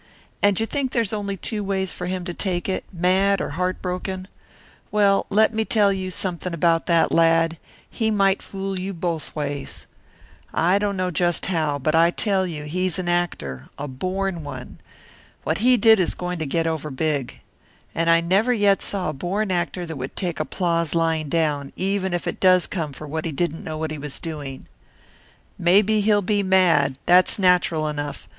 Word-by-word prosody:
And 205 -2 +3
you 225 - +1
think 270 +2 -2
there's 230 -4 0
only 200 -2 -3
two 210 +1 -4
ways 190 -1 -1
for 180 - -5
him 180 -1 -3
to 175 - -4
take 180 -1 -2
it, 190 - -2
mad 190 +2 +2
or - - -2
heart 180 +4 -2
broken? 185 +1 -4 0.6
Well, 200 -2 +3
let 215 +2 +3
me 220 0 +1
tell 205 -2 +3
you 190 -1 -3
something 180 -1 -3
about 165 0 +2
that 170 -2 +3
lad 165 0 +3 0.3
he 220 -1 -1
might 195 -2 +2
fool 195 -1 -5
you 190 +1 -4
both 165 -2 -3
ways. 145 -2 -4 0.7
I 180 +5 +3
don't 205 -1 -1
know 185 0 -1
just 175 +1 0
how, 155 -5 0
but 155 +3 -1
I 165 +1 +5
tell 190 0 0
you 155 -4 -6
he's 185 +5 -2
an 185 -1 -3
actor, 75 - -2
a 145 - -4
born 185 +5 -3
one. 135 -3 -8 0.6
What 160 +4 -1
he 250 +3 +4
did 225 -2 +6
is 180 - 0
going 180 -1 -4
to 160 - -2
get 165 +4 0
over 160 -2 -2
big. 145 -1 -2 0.5
And 165 0 0
I 165 0 +5
never 195 +8 +2
yet 205 -4 +3
saw 195 -4 -1
a - - -3
born 190 +8 -2
actor 175 0 -1
that 160 -3 -6
would 130 +1 -6
take 175 -3 -2
applause 170 0 0
lying 165 -2 +1
down, 145 -3 0
even 190 0 0
if 175 -1 -2
it - - -3
does 185 -1 +5
come 160 -6 -3
for 150 - -9
what 155 +2 -4
he 165 - -2
didn't 165 +2 -2
know 155 0 -5
he 155 -1 -3
was 145 -1 -3
doing. 145 -5 -7 0.9
Maybe 205 +5 +4
he'll 205 0 +3
be 205 +2 +1
mad 170 -8 +3
that's 180 +1 +5
natural 180 -5 +2
enough. 145 -1 -5
180 Hz, 190 wpm, -23 LUFS, 160-195 Hz, 0.9 s, did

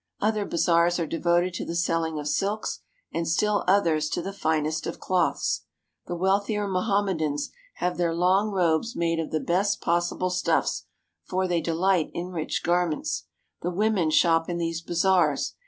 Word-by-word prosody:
Other 215 -1 +1
bazaars 170 0 +3
are 165 - 0
devoted 175 +2 +1
to - - -4
the 170 - -4
selling 165 -2 0
of 150 -1 -4
silks 200 +8 -1 0.3
and 165 -1 -1
still 205 +5 +1
others 165 -6 +3
to - - -2
the 195 - -5
finest 155 -4 -1
of - - -5
cloths. 180 -2 0 0.4
The 175 - -3
wealthier 200 +3 +1
Mo 185 -2 0
hammedans 185 -8 0 0.2
have 180 0 -2
their 175 -1 +1
long 185 +5 +3
robes 185 +3 +1
made 165 -1 0
of 160 - -2
the 155 - -1
best 185 +6 +1
pos 175 +1 +1
sible 185 0 -2
stufTs, 180 - 0 0.4
for 185 0 -1
they 175 -2 +1
delight 170 +1 +1
in 175 +1 -3
rich 160 -3 -3
garments. 175 -2 0 0.4
The 175 - -1
women 195 -2 +1
shop 165 +1 +3
in 175 - -2
these 165 -1 -2
bazaars. 175 -3 +2
175 Hz, 170 wpm, -26 LUFS, 165-190 Hz, 0.4 s, bazaars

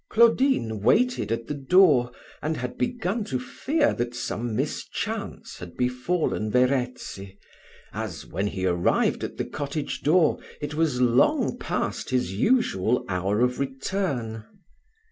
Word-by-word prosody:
Claudine 230 - +3
waited 240 - +2
at 115 0 -1
the 150 - -4
door, 140 -4 +4 0.3
and 155 +1 -1
had 125 0 -4
begun 230 -3 -1
to 130 - -2
fear 290 - 0
that 120 0 -3
some 120 -2 -3
mischance - - -4
had 90 -1 -10
befallen 125 -1 0
Verezzi, 125 -6 -1 0.6
as, - - -5
when 100 +2 -2
he 95 -2 -3
arrived 85 -1 +1
at - - -5
the - - -2
cottage 145 +1 -4
door, 160 +1 +3 0.2
it 145 0 -4
was 150 -5 +1
long 125 0 +3
past - - -2
his 125 -8 0
usual 125 - +2
hour 100 +4 0
of 125 0 +1
return. 135 - -2
125 Hz, 130 wpm, -25 LUFS, 115-165 Hz, 0.6 s, door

